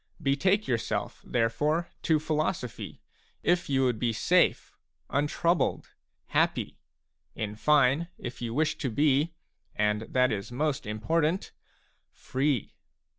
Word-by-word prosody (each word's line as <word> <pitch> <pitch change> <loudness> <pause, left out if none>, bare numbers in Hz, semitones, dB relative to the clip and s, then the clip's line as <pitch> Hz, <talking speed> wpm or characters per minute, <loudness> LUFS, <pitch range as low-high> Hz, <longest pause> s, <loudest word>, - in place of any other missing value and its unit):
Betake 185 +10 +2
yourself 115 -3 -2
therefore 145 +8 0
to 160 - +3
philosophy 155 - -3 0.4
if 175 -2 +2
you 135 -1 +2
would 125 -4 +1
be 120 -2 +1
safe, 110 - +2 0.4
untroubled, 165 +4 +1 0.4
happy, - - 0 0.6
in 105 -1 -4
fine, 145 +5 +3
if 125 -1 -7
you 120 -1 -3
wish 155 +6 0
to 130 - -1
be, 145 +6 +2 0.2
— - - -43
and 105 0 +1
that 130 0 +3
is 100 +1 -3
most 140 -1 -1
important, 160 - 0 0.3
— - - -42
free. 135 -2 -1
140 Hz, 125 wpm, -28 LUFS, 120-155 Hz, 0.6 s, to